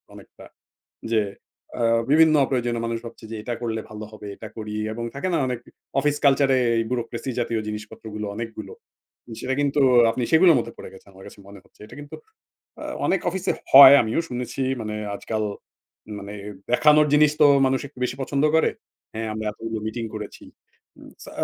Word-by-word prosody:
অনেকটা - - -15 0.7
যে, 110 - +4 0.6
আ - - +1 0.3
বিভিন্ন 160 0 +6
অপ্রয়োজনীয় 120 -3 -1
মানুষ 115 0 -2
ভাবছে 115 -1 -11
যে - - -4
এটা 120 +2 -4
করলে 110 -1 -2
ভালো 105 0 -7
হবে, 105 -1 -10
এটা 110 - -9
করি। 105 -1 -6 0.2
এবং 115 +1 -5
থাকে 140 +7 -3
না? - - +2
অনেক 125 -2 -3 0.4
অফিস 145 +1 0
কালচারে 135 -1 +4 0.3
bureaucracy 120 +1 -3
জাতীয় 115 -2 -1
জিনিসপত্রগুলো, 105 0 -7
অনেকগুলো। 110 -3 -7 0.7
সেটা 130 - -2
কিন্তু 145 0 +1 0.3
আপনি 125 - -3
সেগুলোর 165 0 +6
মধ্যে 115 - -5
পড়ে - - -10
গেছেন, 95 - -16
আমার 95 0 -14
কাছে - - -15
মনে 100 0 -12
হচ্ছে। - - -29
এটা - - -13
কিন্তু 145 - -10 0.7
আ - - -6 0.2
অনেক 190 - +1
অফিসে 190 +1 -2 0.2
হয়, 135 0 +11
আমিও 110 +7 -1
শুনেছি। 125 +2 -4 0.2
মানে 105 -1 -4 0.2
আজকাল 110 +1 -3 0.7
মানে 100 +1 -8 0.4
দেখানোর 150 +4 +5
জিনিস 150 0 +5
তো - - +8 0.2
মানুষ 130 0 +1
একটু 135 - -19
বেশি 125 - -3
পছন্দ 140 +2 -1
করে। 160 - +3 0.4
হ্যাঁ, 110 0 -4
আমরা 110 0 -5
এতগুলো 115 +1 -6
মিটিং 115 +1 -5
করেছি। 105 -1 -8 0.5
উম - - -14
সা - - -11
120 Hz, 170 wpm, -23 LUFS, 110-140 Hz, 0.7 s, হয়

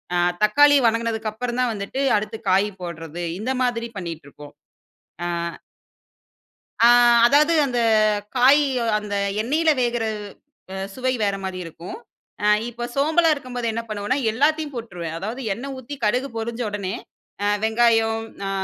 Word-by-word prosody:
ஆ - - +2 0.3
தக்காளி 290 +6 +6
வணங்குனதற்கப்புறம் 230 +1 -2
தான் 245 -2 +1
வந்துட்டு 205 +6 -4 0.2
அடுத்து 215 +1 -5
காய் 195 +3 +3
போடுறது 165 0 -6 0.2
இந்த 250 +5 -2
மாரி 235 -1 -1
பண்ணீட்டுருகோம். 155 -5 -8 0.7
ஆ. - - -1 1.6
ஆ, - - +9 0.4
அதாவது 295 +6 +4
அந்த 245 -3 -1 0.6
காயி 275 +4 +6 0.4
அந்த 210 -1 -5 0.3
எண்ணெயில 310 +8 +2
வேகுற 240 -1 0 0.7
அ - - -5 0.2
சுவை 255 +2 -1
வேற 200 -1 +1
மாரி 190 -1 -4
இருக்கும். 165 - -9 0.5
அ - - +3 0.2
இப்போ 240 0 -6
சோம்பலா 320 +4 +3
இருக்கும்போது 250 -4 -5
என்ன 230 - -2
பண்ணுவோன்னா, 215 +5 -1
எல்லாத்தையும் 295 +5 0
போட்டுருவேன். 175 -9 -6
அதாவது 220 +8 -5
எண்ணெய் 270 +7 -6
ஊத்தி 260 +3 -8
கடுகு 250 +6 0
பொறிஞ்ச 230 +2 -4
உடனே 200 -2 -4 0.5
அ - - +2 0.2
வெங்காயம் 225 0 +2 0.3
அ, - - -2
230 Hz, 130 wpm, -22 LUFS, 205-260 Hz, 1.6 s, ஆ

